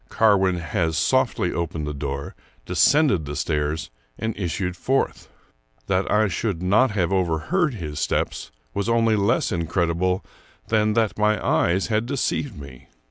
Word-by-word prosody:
Carwin 95 -5 +3
has 80 -2 -1
softly 130 - +1
opened 80 -2 -3
the 75 - -4
door, 70 -1 -4 0.3
descended 140 - +3
the 75 +1 -5
stairs, 75 0 -2 0.3
and 110 -1 -3
issued 90 -1 -2
forth. 135 +9 -1 0.6
That 95 0 0
I 110 0 +3
should 95 -1 -2
not 105 +8 +4
have 95 -3 0
overheard 95 - 0
his 75 -7 -5
steps - - -1 0.2
was 100 +2 -2
only 115 -1 +3
less 100 +2 +1
incredible 85 +2 0 0.4
than 110 -1 +2
that 110 -2 0
my 105 0 +2
eyes 95 +3 +2
had 110 +2 +1
deceived 140 - -2
me. 70 -3 -12
95 Hz, 140 wpm, -23 LUFS, 80-110 Hz, 0.6 s, not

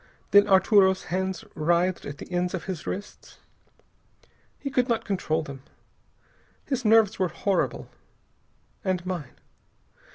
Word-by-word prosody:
Then 205 0 +7
Arturo's 190 0 +4
hands 190 0 -2
writhed 175 +3 +1
at 145 - -7
the - - -10
ends 180 +1 0
of 175 - -5
his 185 -5 -6
wrists. 205 +2 -7 1.2
He 275 - -5
could 250 -1 +1
not 230 - 0
control 165 -5 -1
them. 140 -2 -9 1.0
His 265 -3 -2
nerves 220 -1 +4
were 185 - +2
horrible. 195 +4 -1 1.0
And 185 -3 -1
mine. 175 -8 -5
190 Hz, 125 wpm, -26 LUFS, 175-205 Hz, 1.2 s, Then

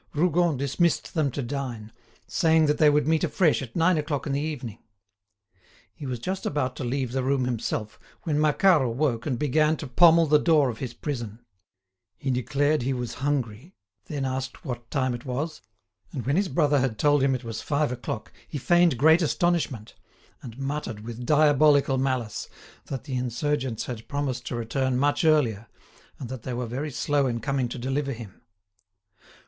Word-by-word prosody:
Rougon 170 -1 +2
dismissed 140 +5 0
them 155 -4 +1
to 135 +2 -4
dine, 120 -4 -5 0.3
saying 160 -3 +3
that 150 0 +1
they 150 - +6
would 150 0 +2
meet 160 -1 +2
afresh 170 -7 +2
at 125 -3 -8
nine 170 0 +3
o'clock 150 -2 -2
in 140 - -2
the 140 - 0
evening. 125 -8 -5 1.1
He 145 - -8
was 125 -1 -3
just 185 +11 -4
about 130 -3 -1
to - - -4
leave 130 0 -2
the 130 +1 -1
room 130 0 +1
himself, 110 -3 -3 0.2
when 150 -3 0
Macquart 155 +2 +4
awoke 125 -1 -1
and 130 -4 -1
began 150 +3 +2
to - - -6
pommel 165 +5 +6
the 150 0 +4
door 150 -4 +3
of 110 - -11
his 125 -3 -5
prison. 120 -5 -5 0.7
He 135 - -2
declared 140 +4 +1
he 135 +2 0
was 125 -1 -4
hungry, 135 - -2 0.3
then 145 -3 -3
asked 130 +2 -4
what 120 -3 -6
time 130 -3 0
it 120 - -6
was, 150 +4 -4 0.5
and 130 -6 -5
when 140 +3 +1
his 195 +1 +1
brother 145 +1 +2
had 130 -4 -1
told 145 +3 +3
him 135 -1 +3
it 130 - -6
was 115 -1 -5
five 145 -2 0
o'clock, 120 -2 -5 0.2
he - - -5
feigned 175 0 +3
great 160 +6 +5
astonishment, 160 -8 0 0.5
and 120 -2 -10
muttered, 135 -5 -4
with 120 +2 -7
diabolical 145 -2 +4
malice, 130 -5 -2 0.4
that 135 - -5
the 140 - -7
insurgents 125 0 -2
had 115 -3 -7
promised 135 -4 -3
to - - -3
return 125 +2 -1
much 145 +3 +1
earlier, 125 -9 +2 0.5
and 130 - -6
that 130 -2 -6
they 125 +1 -4
were 125 0 -2
very 130 +6 -4
slow 145 0 0
in 120 -2 -2
coming 135 -2 -1
to 120 - -6
deliver 135 +3 -2
him. 110 -5 -11
135 Hz, 180 wpm, -26 LUFS, 125-150 Hz, 1.1 s, they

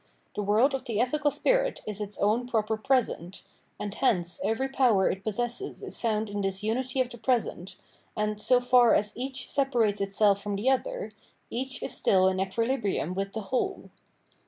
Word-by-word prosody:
The - - -1
world 215 +7 +3
of 270 - -3
the 220 -3 -2
ethical 290 +5 +2
spirit - - +1
is 210 -1 -5
its 205 -1 -5
own 225 +4 +1
proper 220 -2 0
present; 215 - -1 0.4
and 205 -1 -4
hence 175 -8 0
every 225 +6 0
power 245 -8 +3
it 190 +1 -6
possesses 240 - -3
is - - -5
foimd 220 -2 0
in 205 0 -3
this 195 0 -2
unity 255 +4 -1
of 250 - -1
the 240 - -10
present, 220 -6 -1 0.4
and, 210 0 -1
so 250 +3 +4
far 245 -1 +5
as 210 0 +1
each 265 +2 -4
separates 235 -7 +1
itself 200 0 +2
from 205 0 -3
the 225 +7 +2
other, - - -2 0.4
each 260 +1 -4
is - - -2
still 185 -1 +3
in 185 0 -2
equilibrium 205 - -1
with 195 +1 -3
the 220 - -3
whole. 245 +6 -3
220 Hz, 180 wpm, -28 LUFS, 200-255 Hz, 0.4 s, far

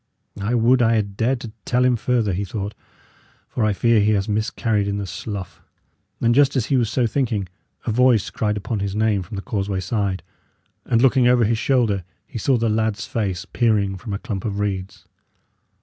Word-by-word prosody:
"I 110 +5 0
would 120 +2 +4
I 115 -1 +4
had 100 -2 -1
dared 120 +4 +1
to 115 - -7
tell 125 +1 +2
him 125 -1 +4
further," 115 -3 0
he 95 +3 -1
thought; 100 +1 -4 0.7
"for 120 - -2
I 110 - +3
fear 115 +3 +3
he 105 +1 +3
has 100 -1 0
miscarried 110 0 0
in 100 0 -1
the 100 - -3
slough." 95 +1 -6 0.6
And 115 0 +3
just 140 +1 +4
as 125 -5 +1
he 140 - +1
was 120 -4 +2
so 125 +1 +1
thinking, 115 -5 -1 0.4
a 115 - 0
voice 125 -2 +3
cried 105 -1 -1
upon 105 +2 -3
his 100 0 -3
name 110 -2 +2
from 90 +4 -8
the 100 - -5
causeway 100 -2 -2
side, 95 0 -2 0.6
and, 115 +1 +2
looking 130 -1 +5
over 125 -1 +4
his 110 +1 +1
shoulder, 115 -9 +1 0.2
he 115 - -7
saw 130 +4 +2
the 115 0 0
lad's 110 -2 0
face 95 -4 -2
peering 105 -3 +1
from 105 +4 -7
a 100 - -1
clump 100 -2 -5
of 100 -2 -3
reeds. 100 -2 -3
110 Hz, 200 wpm, -22 LUFS, 100-120 Hz, 0.7 s, looking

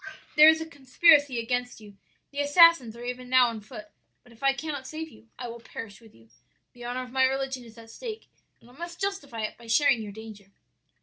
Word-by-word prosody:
"'There 305 +1 +9
is 320 0 +3
a 320 - -5
conspiracy 285 -1 +3
against 245 +1 -3
you; 205 -2 -15 0.4
the 285 - -6
assassins 290 -5 +5
are 240 - -9
even 250 0 -6
now 255 -1 +5
on 225 -2 -7
foot; 210 -1 -11 0.3
but 245 - -20
if 230 - -20
I 275 0 +4
cannot 275 -1 -6
save, 310 -8 -9
I 245 - -6
will 235 0 -8
perish 225 -2 -10
with 225 -2 -19
you. 115 0 -22 0.4
The 245 - -13
honor 250 +1 -3
of 250 - -12
my 260 0 +3
religion 265 -1 -2
is 230 -1 -16
at 225 0 -13
stake, 450 - -8 0.3
and - - -21
I - - -19
must 345 +4 -9
justify 295 - -4
it 215 - -5
by 235 - -14
sharing 235 0 +3
your 210 -2 -7
danger.' 210 -2 -12
250 Hz, 220 wpm, -27 LUFS, 230-285 Hz, 0.4 s, There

